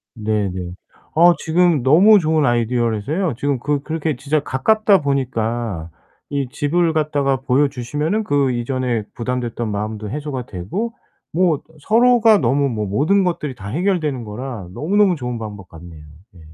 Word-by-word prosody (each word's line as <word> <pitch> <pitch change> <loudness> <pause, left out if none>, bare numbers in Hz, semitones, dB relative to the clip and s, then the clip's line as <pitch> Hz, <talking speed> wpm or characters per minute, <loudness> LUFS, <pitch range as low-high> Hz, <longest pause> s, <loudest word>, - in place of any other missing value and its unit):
네네. 100 -5 -2 0.4
아 175 +2 +6
지금 165 -4 +2
너무 190 - +6
좋은 155 -3 +1
아이디어라서요. 120 - 0
지금 140 -1 0
그 145 +2 -1
그렇게 155 -2 -2
진짜 145 +4 0
가깝다 195 +9 +2
보니까 115 - -2 0.4
이 140 -3 -2
집을 160 +5 0
갖다가 145 -3 +1
보여 135 +2 +2
주시면은 150 - -2
그 140 -5 +1
이전에 120 -2 -2
부담됐던 120 -2 -3
마음도 105 +1 -4
해소가 140 -3 -4
되고 185 - -4 0.4
뭐 175 -1 +3
어떤 155 +2 -11
서로가 230 - +4
너무 140 +1 +1
뭐 105 -4 -3
모든 155 - +2
것들이 150 -6 -2
다 100 -3 -9
해결되는 155 - -1
거라 110 -3 -7
너무너무 195 +3 +2
좋은 125 -4 -4
방법 105 -4 -8
같네요. 80 -2 -12 0.3
예. - - -15
135 Hz, 330 characters per minute, -19 LUFS, 115-160 Hz, 0.4 s, 아